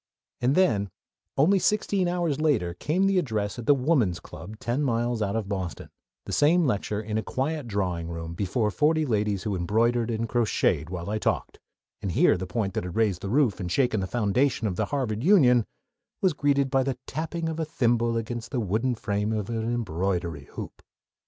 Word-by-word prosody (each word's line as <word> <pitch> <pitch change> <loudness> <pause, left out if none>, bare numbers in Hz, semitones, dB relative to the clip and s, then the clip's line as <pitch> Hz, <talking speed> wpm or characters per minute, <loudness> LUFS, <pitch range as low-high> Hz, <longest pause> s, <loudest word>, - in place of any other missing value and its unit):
And 125 +3 +2
then, 105 - +2 0.5
only 185 +8 +4
sixteen 200 -1 +1
hours 170 -5 0
later, 115 - +1
came 160 - 0
the 195 -1 +3
address 110 - -2
at 120 - -7
the 145 - +6
Woman's 125 - +1
Club 110 +1 -10
ten 120 +6 -1
miles 120 -3 0
out 100 0 -1
of 110 -3 -2
Boston; 95 -4 -4 0.3
the - - -6
same 165 +4 +4
lecture, 105 -4 -1
in 110 0 -2
a - - -1
quiet 140 +5 -2
drawing 90 -6 -2
room, 85 0 -5
before 105 +4 0
forty 155 +5 +2
ladies 105 -5 0
who 105 -3 -1
embroidered 115 +6 +1
and 115 0 -1
crocheted 110 - +1
while 85 -2 -5
I 105 +1 -1
talked, - - -2 0.4
and 100 -4 -2
here - - +4
the 90 +1 -4
point 100 +1 -2
that - - -2
had 90 -1 -6
raised 105 -5 +1
the 100 - -4
roof 125 -4 +2
and 90 -3 -4
shaken 125 -2 +2
the 95 - -2
foundations 115 +2 +1
of 90 - -3
the - - 0
Harvard 120 -6 -2
Union 130 - +5 0.5
was 190 -6 +2
greeted 140 -2 +1
by 135 - +3
the 130 -1 -2
tapping 165 +2 -3
of 160 0 -3
a 160 - 0
thimble 120 -5 +1
against 115 0 -4
the 130 - -2
wooden 115 +4 0
frame 105 -1 -1
of 110 0 -2
an 115 0 -1
embroidery 90 -8 -2
hoop! - - -8
115 Hz, 195 wpm, -26 LUFS, 100-140 Hz, 0.5 s, the